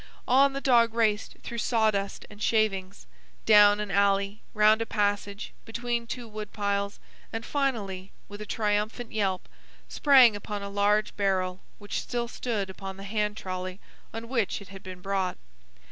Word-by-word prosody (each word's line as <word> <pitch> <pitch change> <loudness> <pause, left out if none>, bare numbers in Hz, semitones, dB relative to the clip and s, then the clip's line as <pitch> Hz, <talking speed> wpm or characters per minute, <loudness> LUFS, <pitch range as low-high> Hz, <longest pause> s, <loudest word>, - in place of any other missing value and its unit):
On 270 +2 +5
the 275 - -3
dog 235 -4 +4
raced 220 -2 +1
through 235 - -5
sawdust 215 -4 0
and 210 0 -14
shavings, 200 -4 0 0.4
down 210 -1 +7
an 210 -1 -3
alley, 200 +1 +2
round 215 +1 +5
a - - 0
passage, 205 -1 -1
between 235 +1 -3
two 240 0 -5
wood 215 -1 -7
piles, 200 -1 -2 0.3
and 225 +1 -4
finally, 205 -10 -2 0.2
with 205 0 -9
a 210 - -7
triumphant 215 +3 -1
yelp, 195 -4 -1 0.4
sprang 260 -6 +6
upon 205 0 -5
a 200 - -5
large 205 +1 +1
barrel 185 -2 0 0.2
which 205 -1 -4
still 240 -1 -3
stood 225 -4 -3
upon 190 0 -8
the 195 - -9
hand 210 +1 -1
trolley 185 0 -5 0.3
on 225 +1 -6
which 230 -5 0
it 200 - -13
had 195 -1 -10
been 185 -1 -9
brought. 190 -1 -1
210 Hz, 160 wpm, -27 LUFS, 195-225 Hz, 0.4 s, down